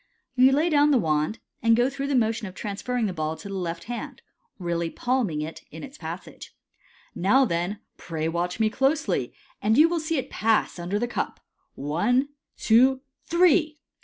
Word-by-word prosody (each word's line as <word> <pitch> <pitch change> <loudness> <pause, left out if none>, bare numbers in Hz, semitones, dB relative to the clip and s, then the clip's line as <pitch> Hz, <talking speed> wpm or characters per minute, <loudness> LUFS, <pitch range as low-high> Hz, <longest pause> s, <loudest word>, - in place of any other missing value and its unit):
You 255 +1 +5
lay 310 +5 +2
down 290 0 +5
the 285 - +4
wand, 155 0 0 0.2
and 230 0 +4
go 240 +2 +3
through 275 0 -4
the 280 - 0
motion 225 -2 +1
of 185 - -10
transferring 225 +5 -2
the 195 - -2
ball 155 -1 -2
to 205 - -9
the 200 - -6
left 170 -3 -4
hand, 240 0 -7 0.3
really 170 -2 -2
palming 235 -9 -1
it 155 +2 -6
in - - -10
its 280 0 -9
passage. - - -8 0.3
" - - -30 0.2
Now, 255 +9 +3
then, 175 +1 -2 0.2
pray 160 -2 -4
watch 175 +4 -2
me 220 -1 +2
closely, 275 +6 0 0.3
and 220 +2 +2
you 310 +3 +7
will 340 0 -1
see 315 0 -1
it 265 - -4
pass 220 -4 +1
under 175 +4 -2
the 240 +3 -1
cup. 240 - -3 0.4
One, 210 - +1 0.3
two, 255 +4 +4 0.2
three!" 335 -3 +3
225 Hz, 185 wpm, -25 LUFS, 175-270 Hz, 0.4 s, you